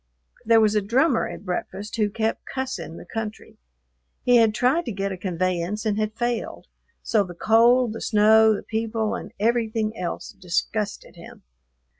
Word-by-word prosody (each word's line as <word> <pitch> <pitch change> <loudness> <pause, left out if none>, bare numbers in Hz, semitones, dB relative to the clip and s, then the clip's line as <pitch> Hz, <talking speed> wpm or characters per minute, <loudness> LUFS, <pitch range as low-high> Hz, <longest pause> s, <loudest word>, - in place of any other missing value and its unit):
There 230 0 +5
was 215 -1 +3
a 210 - +2
drummer 245 +6 +2
at - - -9
breakfast 200 +4 -4
who 210 -2 +2
kept 220 +2 -2
"cussing" 205 -11 -5
the - - -11
country. 220 -1 -7 0.6
He 245 -1 +5
had 225 -2 +4
tried 265 +10 +2
to 240 - -3
get 195 -1 -3
a - - -3
conveyance 185 +3 -2
and 210 -1 0
had 215 0 -2
failed; 240 -1 -3 0.4
so 215 -3 +2
the 180 -2 -9
cold, 235 +4 +4
the 225 - -7
snow, 220 0 +5
the - - -6
people, 220 0 -2
and - - -6
everything 225 -1 0
else 180 -5 -5
disgusted 195 +3 -3
him. - - -13
220 Hz, 165 wpm, -24 LUFS, 205-230 Hz, 0.6 s, There